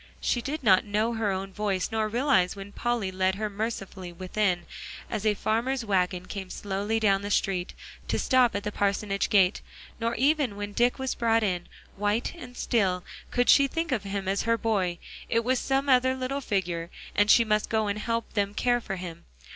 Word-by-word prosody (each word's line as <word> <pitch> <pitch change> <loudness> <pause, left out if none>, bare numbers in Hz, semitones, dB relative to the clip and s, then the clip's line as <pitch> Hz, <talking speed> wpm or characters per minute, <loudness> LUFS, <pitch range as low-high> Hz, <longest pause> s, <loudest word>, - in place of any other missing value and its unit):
She 240 - 0
did 285 +3 -4
not 190 -5 +5
know 215 +2 0
her 225 -2 0
own 195 0 -3
voice, 195 -2 -1
nor 220 -1 0
realize 235 -6 +2
when 200 0 -9
Polly 235 -4 -1
led 185 0 +1
her 210 +1 -3
mercifully 200 -4 -4
within, 185 0 -1 0.5
as 215 0 -1
a 210 - +3
farmer's 235 +4 -1
wagon 180 -3 0
came 190 -1 -6
slowly 205 +3 -2
down 195 -3 +3
the 205 - -4
street, 190 -3 0 0.3
to - - 0
stop 255 -3 +3
at 200 - -2
the 210 - -3
parsonage 200 0 0
gate; 195 -2 +4 0.4
nor 230 0 -1
even 280 -5 +2
when 205 0 -5
Dick 240 +3 +2
was 265 -1 -2
brought 225 -1 +2
in, 180 -4 -1 0.3
white 210 +4 0
and 250 -7 -11
still, 185 -6 +1 0.3
could 245 0 +1
she 280 -1 +7
think 330 +2 -3
of 245 -5 +1
him 195 -1 -4
as 195 +1 +1
her 230 0 +1
boy. 195 -7 0 0.3
It 230 0 +2
was 255 +1 +1
some 270 +1 0
other 260 0 +4
little 260 +2 -3
figure, 175 -7 -2 0.3
and 205 +1 +3
she 235 - +7
must 215 -1 +1
go 220 -1 +1
and 205 +1 -2
help 230 +1 -2
them 205 -1 0
care 245 +1 +2
for 195 -4 -4
him. 170 -2 -8
210 Hz, 195 wpm, -27 LUFS, 195-235 Hz, 0.5 s, she